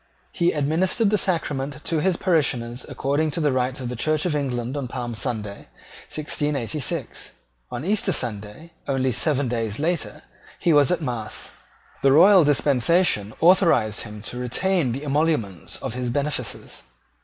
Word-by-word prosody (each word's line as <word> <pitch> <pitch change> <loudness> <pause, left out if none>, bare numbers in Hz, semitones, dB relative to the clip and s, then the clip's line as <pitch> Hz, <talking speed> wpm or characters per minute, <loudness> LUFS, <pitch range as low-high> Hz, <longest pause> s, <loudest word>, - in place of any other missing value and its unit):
He 175 0 +1
administered 170 +9 +1
the 210 - +3
sacrament 150 -5 -2
to 165 - 0
his 185 0 +1
parishioners 130 -8 0
according 145 +3 0
to 160 - -2
the 150 -3 +2
rites 130 +1 -1
of 125 - -4
the 125 - -4
Church 155 +6 0
of 170 -4 0
England 130 -3 -2
on 140 -3 -3
Palm 120 -1 -5
Sunday 110 -4 -4 0.4
1686. 150 -2 -2 0.4
On 125 +6 -5
Easter 200 0 +1
Sunday, 115 - -4 0.2
only 130 -2 +1
seven 140 +2 +1
days 115 -3 -2
later, 165 +2 -2 0.3
he 170 - +2
was 145 -2 +5
at 175 -2 0
mass. 120 -5 -4 0.5
The 135 - +4
royal 180 +5 +7
dispensation 140 - +2
authorised 165 - +4
him 105 -1 -9
to 120 +2 -6
retain 150 +4 0
the 135 +5 -4
emoluments 145 - -1
of - - -5
his 125 0 -3
benefices. 145 +3 -2
140 Hz, 150 wpm, -23 LUFS, 120-160 Hz, 0.5 s, royal